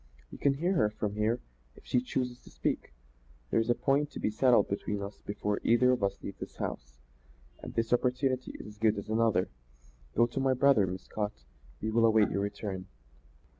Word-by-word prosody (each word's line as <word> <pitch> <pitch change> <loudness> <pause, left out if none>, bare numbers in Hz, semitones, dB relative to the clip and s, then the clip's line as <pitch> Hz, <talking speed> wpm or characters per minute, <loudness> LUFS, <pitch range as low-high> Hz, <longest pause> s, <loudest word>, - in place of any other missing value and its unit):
"You - - -10
can 140 -1 +3
hear 175 +7 +1
her 110 - +3
from 105 -1 -3
here 110 +3 0 0.3
if - - -18
she 125 - +2
chooses 125 -1 -2
to - - -16
speak. - - -2 0.6
There's 115 +1 +2
a 120 - +4
point 140 +3 +1
to - - -8
be 105 - 0
settled 120 -1 +4
between 100 +1 -2
us 100 +1 -8
before 105 0 -1
either 125 +2 +5
of 125 -3 +1
us 100 0 -1
leaves 100 - -7
this - - -7
house, - - -5 0.6
and - - -8
this 115 +1 +1
opportunity 130 +1 +1
is - - -8
as 105 0 -11
good 110 -1 +3
as 100 - -6
another. 110 -4 +2 0.7
Go 120 - +5
to 120 +3 -4
my 135 -1 +2
brother, 130 -7 +4
Miss 95 +1 -5
Scott; 105 - -4 0.4
we 110 - -1
will 115 +1 +4
await 110 -2 +4
your 100 - 0
return." 100 -2 -4
110 Hz, 200 wpm, -30 LUFS, 105-125 Hz, 0.7 s, either